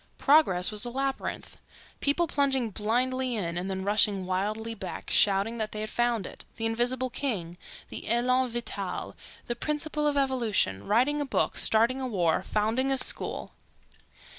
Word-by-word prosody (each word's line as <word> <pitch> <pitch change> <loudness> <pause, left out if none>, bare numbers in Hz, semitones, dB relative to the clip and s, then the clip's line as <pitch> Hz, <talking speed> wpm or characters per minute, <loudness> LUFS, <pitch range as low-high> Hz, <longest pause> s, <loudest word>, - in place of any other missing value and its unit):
Progress 245 - +4
was 210 -1 0
a 240 - +2
labyrinth... 270 +2 -4 0.4
people 290 +5 +1
plunging 270 -6 0
blindly 250 +4 -1
in 170 -6 -3
and 180 +2 -3
then 190 0 -3
rushing 200 -1 +2
wildly 210 +5 -2
back, 190 -5 -7
shouting 205 +3 +3
that 215 -1 -3
they 215 - -4
had 215 - -5
found 240 -4 0
it... - - -9
the 225 - -3
invisible 245 +3 0
king—the 190 -13 -5
elan 250 +2 +2
vital—the 240 0 -6
principle 300 +1 -2
of 290 -1 0
evolution... 230 - 0
writing 260 +8 +2
a - - +1
book, 270 - -1
starting 235 +4 +3
a 260 - -2
war, 175 -8 +1
founding 225 +6 0
a 270 - +2
school.... - - +3
235 Hz, 150 wpm, -27 LUFS, 205-260 Hz, 0.4 s, Progress